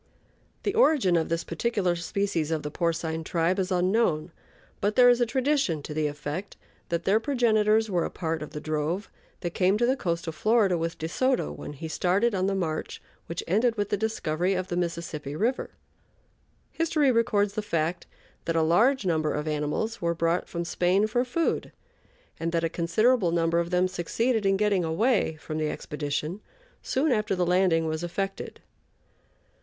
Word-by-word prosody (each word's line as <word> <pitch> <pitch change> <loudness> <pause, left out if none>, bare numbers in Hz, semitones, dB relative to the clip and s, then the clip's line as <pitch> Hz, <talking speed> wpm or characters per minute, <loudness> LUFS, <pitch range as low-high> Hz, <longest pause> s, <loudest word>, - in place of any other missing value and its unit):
The 405 - 0
origin 300 - +4
of 165 -1 +1
this 165 0 -1
particular 185 0 0
species 175 -2 -1
of 160 -2 -1
the 150 - -4
porcine 165 -1 -1
tribe 170 +3 0
is 190 0 -1
unknown, 180 -3 +1 0.5
but 205 +1 0
there 245 -1 +7
is 245 0 +4
a 240 - +3
tradition 260 - 0
to 150 - -6
the 155 0 0
effect 150 +6 -5 0.3
that 170 0 -1
their 200 +4 +3
progenitors 220 -4 +2
were 180 -5 0
a - - -2
part 160 -2 -3
of 150 - -6
the 150 - -6
drove 155 +6 -2 0.3
that 175 -2 -3
came 190 +2 +2
to 240 - +2
the 260 +2 +2
coast 170 -9 -2
of 165 - -4
Florida 215 +1 +3
with 165 0 -2
De 160 - -3
Soto 255 +9 0
when - - -8
he 155 +3 -7
started 190 +8 +1
on 190 -1 0
the 195 - 0
march 165 -5 -3 0.3
which 170 - -4
ended 225 +7 +2
with 205 -1 -1
the - - +1
discovery 190 -4 -1
of 185 +1 -3
the 175 - -2
Mississippi 170 -4 -3
River. 235 +9 -1 1.0
History 310 -4 +2
records 210 -4 +2
the 215 - -2
fact 170 -3 -2 0.4
that 165 - -1
a 165 - +3
large 220 - +3
number 155 -3 +1
of 150 +1 -3
animals 150 +9 -2
were 170 0 0
brought 165 +2 0
from 170 0 -3
Spain 180 +4 +2
for 240 +3 +1
food, 315 +7 -1 0.7
and 165 0 -2
that 165 0 +1
a 165 - +1
considerable 195 +5 +2
number 165 0 +1
of 170 0 -1
them 180 +1 +2
succeeded 210 +5 0
in 195 0 +3
getting 205 -3 +2
away 175 +2 +1
from 155 0 -5
the 155 -1 0
expedition 150 +7 -4 0.4
soon 285 +3 0
after 215 -4 +1
the 180 -1 +1
landing 175 -2 +3
was 160 +1 -2
effected. 195 +3 -4
180 Hz, 180 wpm, -27 LUFS, 165-215 Hz, 1.0 s, there